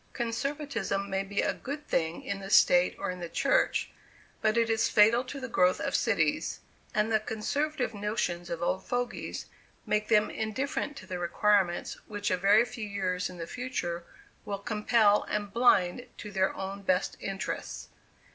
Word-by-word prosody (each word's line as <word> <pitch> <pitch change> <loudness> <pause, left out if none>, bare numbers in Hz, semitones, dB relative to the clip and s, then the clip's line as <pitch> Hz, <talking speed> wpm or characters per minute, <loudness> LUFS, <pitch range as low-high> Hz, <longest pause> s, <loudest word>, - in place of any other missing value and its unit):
Conservatism 235 -5 -2
may 195 0 +1
be 200 +1 -1
a - - +1
good 290 +3 -7
thing 160 0 -1
in 200 0 -3
the 195 0 -7
state, 180 -2 +5
or - - -2
in 180 - -7
the 170 -1 -5
church, - - +1 0.5
but 215 +1 +2
it 230 -1 +3
is 225 0 +2
fatal 220 +4 +5
to 275 +2 -6
the 260 - -5
growth 180 -6 +3
of - - -2
cities; - - +1 0.4
and 215 +1 +2
the 220 - +4
conservative 250 +5 -2
notions 200 -4 -2
of 170 0 -3
old 185 +2 0
fogies 245 0 -3 0.4
make 210 0 0
them 215 -1 +3
indifferent 275 +6 -2
to - - -9
the 180 -2 -5
requirements 180 +1 +1
which 205 -2 -2
a - - +4
very 205 +5 +5
few 230 -4 -6
years 185 -2 -1
in 180 - -10
the 165 - -5
future 175 -7 -3 0.4
will 200 - -3
compel, 210 0 +3
and 205 -1 -2
blind 235 -2 +3
to 210 - -8
their 190 -1 +2
own 195 +1 -5
best 185 -1 +1
interests. 195 +2 -5
210 Hz, 170 wpm, -29 LUFS, 190-235 Hz, 0.5 s, state